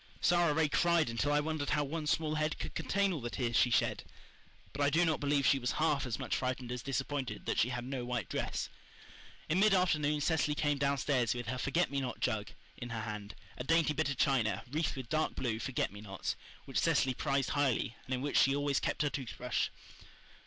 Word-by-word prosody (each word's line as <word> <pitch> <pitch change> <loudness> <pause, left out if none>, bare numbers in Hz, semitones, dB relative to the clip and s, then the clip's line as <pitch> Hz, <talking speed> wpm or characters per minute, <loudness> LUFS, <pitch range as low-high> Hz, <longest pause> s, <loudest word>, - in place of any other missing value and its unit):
Sara 175 -2 +3
Ray 155 +1 +2
cried 170 -3 +2
until 130 +5 0
I 145 - +4
wondered 155 -1 -2
how 150 -1 +2
one 150 +2 -4
small 155 0 +1
head 155 0 0
could - - -5
contain 195 +4 +1
all 155 - -4
the 120 - -3
tears 120 -2 -2
she 125 - +5
shed. 120 - +1 0.7
But 145 - -4
I 145 - +4
do 165 +4 +3
not 160 -2 +1
believe 145 -1 +1
she 135 - +4
was 125 -1 -1
half 150 -4 +1
as 115 - -2
much - - -2
frightened 125 -1 -2
as 125 -1 -3
disappointed 130 -2 -3
that - - 0
she 120 - +3
had 125 -1 -3
no 130 -1 -3
white 120 -5 -2
dress. - - -2 0.8
In 165 +4 +2
mid 210 0 +5
afternoon 150 -5 +2
Cecily 150 -1 +1
came 145 -2 +1
downstairs 140 -3 +1
with 120 0 -4
her 130 - -2
forget 165 +6 +1
me 140 -1 0
not 125 -2 -4
jug 110 -4 -1 0.3
in 120 - -6
her 115 -2 -3
hand 105 -2 -6 0.2
a - - -2
dainty 165 +2 +3
bit 140 - 0
of 140 - -2
china, 115 -9 +2
wreathed 155 +2 0
with 130 -3 -6
dark 155 +3 0
blue 115 -4 -1
forget 130 -4 -1
me 100 +1 -10
nots, 95 -3 -4 0.3
which - - -1
Cecily 130 - +2
prized 135 0 0
highly, 135 -5 +1
and 130 - -1
in 125 - -4
which 145 - +2
she 135 +1 +4
always 145 -1 +1
kept - - -1
her 150 - +2
toothbrush. 125 -2 -2
140 Hz, 220 wpm, -33 LUFS, 125-155 Hz, 0.8 s, she